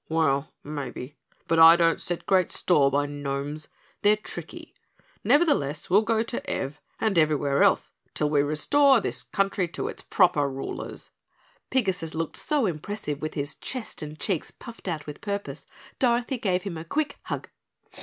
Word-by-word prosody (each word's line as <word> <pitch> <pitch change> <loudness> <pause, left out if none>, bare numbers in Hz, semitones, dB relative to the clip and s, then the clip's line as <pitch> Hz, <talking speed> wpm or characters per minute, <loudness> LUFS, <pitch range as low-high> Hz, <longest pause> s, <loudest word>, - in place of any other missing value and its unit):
"Well, 155 -2 +1
maybe, 145 -2 -6 0.3
but 165 - +2
I 165 +1 +10
don't 165 -1 +2
set 175 -1 -3
great 185 -2 +3
store 145 -6 +3
by 145 +1 +1
gnomes. 145 +1 -4 0.3
They're 210 0 +5
tricky, 215 - -8 0.5
nevertheless 175 - +2
we'll 200 +3 +6
go 220 0 +1
to 235 +1 -4
Ev 135 +2 -3 0.2
and 215 -6 +2
everywhere 145 -3 +2
else - - +3 0.2
till 150 - +1
we 150 -1 +3
restore 265 - +4
this 125 - -3
country 190 +8 0
to 170 - -3
its - - -7
proper 170 -7 +3
rulers." 135 0 -6 0.6
Pigasus 185 -10 -1
looked 165 -1 -3
so 295 -5 +1
impressive 165 -3 -4
with 155 - -4
his 145 -1 -1
chest 255 -8 -5
and 150 0 -7
cheeks 175 +1 -1
puffed 230 -4 -11
out 155 -4 -3
with 150 -1 -8
purpose, 200 -1 -4 0.3
Dorothy 245 0 +1
gave 185 -4 0
him 180 -5 -5
a - - -6
quick 285 - -2
hug. - - -4
165 Hz, 160 wpm, -26 LUFS, 145-205 Hz, 0.6 s, I